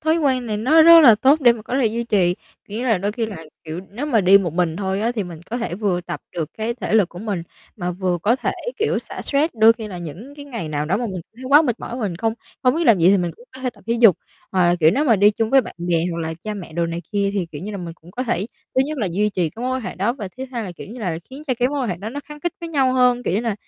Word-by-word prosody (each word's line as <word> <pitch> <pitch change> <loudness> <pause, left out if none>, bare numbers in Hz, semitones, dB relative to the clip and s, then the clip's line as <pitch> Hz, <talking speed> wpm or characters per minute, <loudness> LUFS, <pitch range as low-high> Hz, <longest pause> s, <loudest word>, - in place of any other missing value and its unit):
thói 315 +1 +2
quen 265 -6 +1
này 215 -2 -2
nó 280 +10 +5
rất 335 +1 +9
là 245 -8 +8
tốt 275 +8 +3
để 245 -4 +6
mà 230 -2 -9
có 250 +5 -2
thể 245 - +3
duy 230 +2 -2
trì, 190 -6 +2 0.3
kiểu 210 +2 -5
như 245 - -3
là, 225 -6 +2
đôi 200 +3 -2
khi 225 0 -2
là, 215 -3 -7 0.3
kiểu, 160 +2 -5
nếu 245 +9 -4
mà 240 -7 +3
đi 195 +1 +7
một 175 -5 -2
mình 170 -2 0
thôi 190 0 -2
á 230 +3 0
thì 215 -5 -2
mình 170 -3 -9
có 240 - -2
thể 230 -7 -3
vừa 190 -3 0
tập 175 -1 -6
được 160 -3 -4
cái 225 +2 -2
thể 240 - -3
lực 205 -5 +4
của 175 - -11
mình, 200 -4 -3 0.3
mà 180 -4 -3
vừa 180 0 -1
có 230 +4 +3
thể, - - -1 0.3
kiểu, 440 - +1
xả - - -8
stress. 295 +2 0
Đôi 225 0 +6
khi 225 -2 -8
là 185 -3 -7
những 175 - -9
cái 285 -1 -10
ngày 235 - -6
nào 150 -1 -2
đó 185 - +1
mà 240 +2 -2
mình 190 -4 -5 0.2
thấy 255 - -10
quá 290 +3 +7
mệt 245 -7 -1
mỏi 240 - -6
và - - -5
mình 195 -6 -2
không 225 +4 -1 0.3
không 250 0 +3
biết 335 +2 0
làm 225 -5 +6
gì 170 +1 +5
thì 200 - +5
mình 175 -2 -1
cũng 240 - -17
có 260 - -10
thể 255 -1 -1
tập - - -22
thể 230 - +1
dục, 220 -8 +7 0.4
hoặc 185 -2 +3
là, 175 0 +4
kiểu, 160 0 +6
nếu 275 - +1
mà 235 -7 +4
đi 205 +2 +6
chung 220 +1 -2
với 270 - +6
bạn - - -9
bè, 170 -1 0
hoặc 170 - -4
là 160 0 -3
cha 215 -1 -3
mẹ 180 -5 -8
đồ 170 +1 0
này 165 +1 -4
kia 200 -1 +1
thì, 190 -4 -1
kiểu 160 -1 -9
như 205 - -5
là, - - -4
mình 175 -2 -6
cũng 165 +1 -17
có 245 +7 -4
thể 215 -6 -1 0.3
thứ 260 - +4
nhất 305 0 -4
là 215 - 0
duy 210 +4 +1
trì 180 -5 -1
cái 230 - -9
mối 255 - -1
quan - - -4
hệ - - -5
đó, 200 +6 0
và 220 -7 -6
thứ 260 - -5
hai 235 -3 -3
là, 185 - -6
kiểu 175 - -10
như 240 +4 -9
là, 175 -6 -2
khiến 270 +3 -9
cho 260 - +1
cái 250 0 +2
mối 285 0 -2
quan 250 - -1
hệ 180 - -2
đó 200 +5 -6
nó 280 +5 -6
khắng 300 0 -11
khít 345 +2 -2
với 335 - -5
nhau 270 -5 +2
hơn, 250 -1 +3
kiểu 180 - -1
như 205 - +1
là, 230 -3 -1
215 Hz, 335 wpm, -21 LUFS, 180-250 Hz, 0.4 s, rất